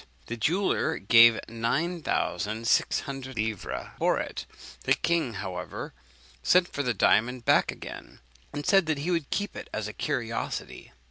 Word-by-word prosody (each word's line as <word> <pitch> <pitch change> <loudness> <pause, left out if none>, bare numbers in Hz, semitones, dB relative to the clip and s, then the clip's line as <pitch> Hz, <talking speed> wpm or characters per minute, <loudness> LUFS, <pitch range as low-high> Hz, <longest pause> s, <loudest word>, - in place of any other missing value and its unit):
The 115 - -4
jeweller 175 - +1
gave 115 +2 +7
nine 140 +10 -1
thousand 110 - -1
six - - +3
hundred 135 -1 -7
livres 110 -2 -3
for - - +2
it. - - -5 0.4
The - - +4
king, 165 -9 0
however, 95 -2 -5 0.5
sent 180 - +4
for 145 - -3
the 125 -4 0
diamond 120 +5 +2
back - - +4
again, - - -10 0.3
and 145 0 -5
said 195 -4 +4
he 155 +2 -1
would 165 -5 -1
keep 205 0 -2
it - - -8
as 110 -1 -3
a 105 - -7
curiosity. 115 -2 -4
125 Hz, 150 wpm, -27 LUFS, 110-160 Hz, 0.5 s, gave